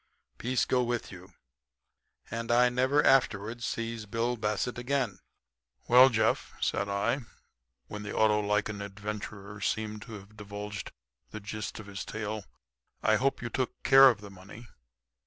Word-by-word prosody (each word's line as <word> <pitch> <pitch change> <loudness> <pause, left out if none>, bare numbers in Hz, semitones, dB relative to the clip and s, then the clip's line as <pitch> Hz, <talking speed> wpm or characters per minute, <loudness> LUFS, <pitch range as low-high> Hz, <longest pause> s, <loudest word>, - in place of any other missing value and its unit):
'Peace 125 +1 +1
go 125 - +2
with 120 -1 -2
you.' 95 +1 -12 1.0
And 115 0 -4
I 125 +1 +5
never 130 +4 +2
afterward 120 -3 +2
sees 115 -2 -3
Bill 115 +3 -1
Bassett 110 +2 -2
again." 125 -6 -1 0.7
"Well, 125 +2 +8
Jeff," 110 -2 +1
said 100 - 0
I, 100 +7 0 0.7
when 105 - -7
the 105 -1 -6
Autolycan 105 -1 +2
adventurer 100 0 -7
seemed 110 +1 -2
to 115 - -10
have 105 0 -11
divulged 105 0 -6 0.4
the 110 - -7
gist 105 +1 -6
of 110 - -9
his 100 -1 -6
tale, 110 -1 -5 0.6
"I 110 0 +4
hope 135 +1 0
you 120 - -3
took 130 +1 -3
care 135 0 +9
of 110 -5 -1
the 100 -1 -10
money. 100 +5 -12
110 Hz, 145 wpm, -29 LUFS, 105-120 Hz, 1.0 s, care